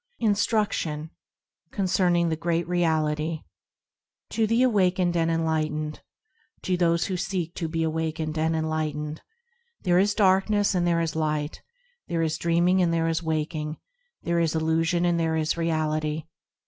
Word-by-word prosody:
Instruction, 205 -8 0 0.6
concerning 180 -3 +1
The 160 - 0
Great 170 +1 -1
Reality 160 -2 0 0.9
TO 225 -1 +1
the 230 +3 +3
awakened 185 -6 +2
and 165 -1 +2
enlightened, 155 -2 -1 0.6
To 185 - +1
those 170 -1 +2
who 190 - -2
seek 180 -2 -3
to 165 - -2
be 165 0 -1
awakened 160 0 -2
and 160 +1 +1
enlightened,– 155 -1 -2 0.6
There 180 0 +3
is 205 +2 +2
darkness 205 +1 +3
and 175 -1 +1
there 170 -1 +2
is 160 -2 -2
Light; 155 -1 -2 0.5
There 165 -1 0
is 160 -1 -1
dreaming 175 +2 +3
and 175 -2 +2
there 165 0 +1
is 165 0 0
Waking; 155 -1 -2 0.5
There 170 0 +1
is 165 -1 +1
illusion 165 +2 +1
and 170 -1 +2
there 160 -1 +1
is 155 -1 0
Reality. 155 -2 -1
165 Hz, 145 wpm, -26 LUFS, 155-175 Hz, 0.9 s, the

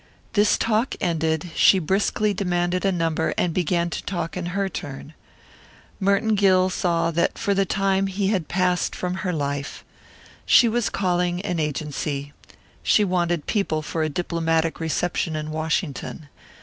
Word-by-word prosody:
This 205 -1 +4
talk 225 +3 0
ended, 160 -1 -1
she 195 - +6
briskly 200 +4 +1
demanded 180 -1 0
a 195 - +3
number 165 -2 0
and 175 -2 +1
began 170 0 0
to - - -3
talk 175 -3 -3
in 180 -1 -3
her 195 +2 -1
turn. 145 -4 -7 0.9
Merton 200 +2 +2
Gill 185 -2 +4
saw 170 -2 0
that 170 +1 0
for 200 -3 0
the 195 -1 +1
time 195 0 +1
he 195 0 -1
had 185 -7 0
passed 180 -1 0
from 180 0 -3
her 185 - -1
life. 140 -3 -3 0.6
She 240 - +6
was 235 0 0
calling 180 -2 0
an 180 -4 -2
agency. 145 -1 -3 0.5
She 210 - +4
wanted 175 -4 0
people 160 -8 0
for 160 +1 -3
a 155 - +1
diplomatic 165 0 -1
reception 165 0 -1
in 155 0 -4
Washington. 155 -1 -3
175 Hz, 150 wpm, -23 LUFS, 160-195 Hz, 0.9 s, she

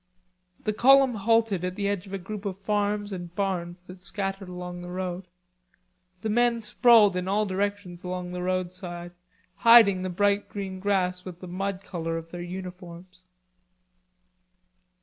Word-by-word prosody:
The 215 - 0
column 270 +3 +6
halted 220 -3 +2
at 180 0 -2
the 200 0 -1
edge 200 -1 -2
of 195 - -10
a - - -2
group 195 +2 -7
of 190 -2 -3
farms 205 0 -1
and 175 -2 -7
barns 180 -3 -2
that 180 0 -12
scattered 195 0 -4
along 180 0 -7
the 175 - -8
road. 180 0 -4 1.0
The 220 - -1
men 240 +1 +2
sprawled 215 -2 +5
in 180 0 -2
all 210 +2 +1
directions 195 -2 -3
along 180 0 -4
the 180 0 -4
roadside 180 -1 -3 0.5
hiding 225 -5 +7
the 185 - -2
bright 200 +3 +1
green 190 -2 -5
grass 185 -2 0
with 180 -2 -9
the 185 - -9
mud 195 +2 -3
color 165 -2 -3
of 165 0 -8
their 175 - -6
uniforms. 180 0 -9
190 Hz, 155 wpm, -26 LUFS, 180-205 Hz, 1.0 s, hiding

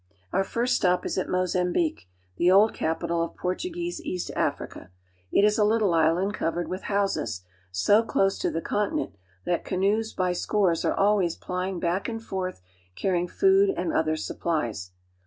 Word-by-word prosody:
Our 195 - +3
first 240 +5 0
stop 180 -1 +1
is - - -2
at - - -3
Mozambique, 185 - 0 0.3
the 175 - +3
old 200 +4 +5
capital 165 +1 -1
of 170 - -3
Por 180 0 -1
tuguese 345 - -4
East 185 - -4
Africa. - - -3 0.4
It 200 - +4
is 210 +1 +2
a - - +5
little 210 -3 +2
island 165 +5 +2
covered 175 -2 -2
with 185 +1 -5
houses, 195 - -1 0.3
so 95 - +4
close 195 -4 +1
to - - 0
the 165 - -3
continent 210 - -1 0.3
that 175 - 0
canoes 205 +4 0
by 180 -1 0
scores 180 -2 +1
are - - +1
always 195 -4 +2
plying 180 0 -3
back 175 +5 -1
and 225 -1 -4
forth 190 - -4 0.3
carrying 180 -2 0
food 390 - +4
and 325 - -1
other 155 - +1
supplies. 120 - -3
185 Hz, 165 wpm, -26 LUFS, 170-210 Hz, 0.4 s, old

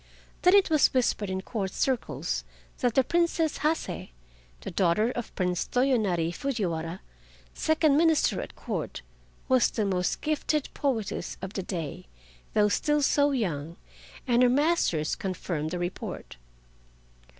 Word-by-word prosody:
Then 360 +2 +6
it 395 -4 +4
was 305 -3 +4
whispered 225 -5 +1
in 190 0 -2
Court 200 -4 -3
circles 260 +1 -1 0.4
that 245 -2 +1
the 265 - +5
Princess 335 +1 +1
Hase, 310 +2 -1 0.5
the - - -6
daughter 190 +6 +2
of 240 -2 -6
Prince 180 -1 -1
Toyonari 215 -11 +1
Fujiwara, 175 -9 -3 0.5
second 315 -2 +2
minister 320 -1 +3
at - - -9
Court, - - -4 0.4
was 260 -2 +4
the 215 - -1
most 180 -2 0
gifted 305 -1 0
poetess 240 -8 -2
of 190 +1 -6
the 195 - -2
day, 170 - -5 0.5
though 210 -1 +5
still 295 +7 +1
so 285 +1 +4
young, 170 - -2 0.5
and 240 -1 +4
her 250 - +6
masters 270 - +2
confirmed 175 -5 -3
the 180 - -3
report. 175 - -5
230 Hz, 135 wpm, -27 LUFS, 180-290 Hz, 0.5 s, Then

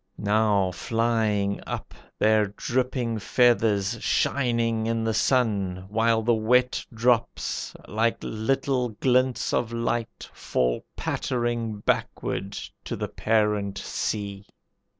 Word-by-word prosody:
Now 105 -2 +2
flying 110 -2 0
up, - - -5 0.2
Their 110 -1 +3
dripping 120 +2 -1
feathers 110 -4 +2
shining 115 -4 +1
in 115 0 0
the 110 0 0
sun, 100 -7 +1
While 115 +1 +2
the 120 +1 +3
wet 125 +3 +2
drops 115 0 0
like 115 +2 +1
little 125 +3 0
glints 125 +3 +1
of 120 - 0
light, 115 0 -2
Fall - - -1
pattering 120 -4 -2
backward 100 -1 -1 0.3
to - - -3
the - - -4
parent 105 -2 +1
sea. 100 0 -3
110 Hz, 105 wpm, -26 LUFS, 105-120 Hz, 0.3 s, Their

